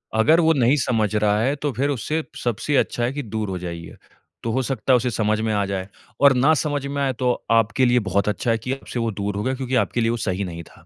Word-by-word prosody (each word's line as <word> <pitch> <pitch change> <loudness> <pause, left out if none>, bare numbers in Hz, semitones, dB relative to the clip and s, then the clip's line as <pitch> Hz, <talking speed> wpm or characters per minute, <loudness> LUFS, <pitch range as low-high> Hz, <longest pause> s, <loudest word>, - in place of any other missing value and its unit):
अगर 150 +10 +4
वो 160 0 +4
नहीं 130 -1 +3
समझ 110 -4 0
रहा 105 0 +2
है 135 +5 +1
तो 145 0 -2
फिर 135 +5 0
उससे 150 +4 -2 0.2
सबसे 120 +5 -1
अच्छा 120 - 0
है 120 +3 0
कि 145 0 -4
दूर 110 -2 -4
हो 95 - -3
जाइए। 85 -1 -7 0.5
तो 115 - -1
हो 130 +4 +1
सकता 130 0 0
है - - +7
उसे 125 +1 -1
समझ 110 0 0
में 110 -1 0
आ 100 -1 +1
जाए। 95 -1 -3 0.3
और 140 -1 +7
ना 140 +5 +4
समझ 145 -2 -2
में 140 0 -3
आए 135 -1 0
तो 125 -1 +2 0.2
आपके 115 +3 +3
लिए 125 0 +4
बहुत 100 +3 +1
अच्छा 115 +3 -1
है 115 - +2
कि 125 +4 -3
आपसे 130 -2 -6
वो 115 -1 -1
दूर 100 0 -3
हो 105 - -2
गया 130 - 0
क्योंकि 130 0 -3
आपके 120 0 +1
लिए 115 - +2
वो 120 - -1
सही 100 -3 -2
नहीं 85 -2 -7
था। - - -19
115 Hz, 270 wpm, -22 LUFS, 105-135 Hz, 0.5 s, है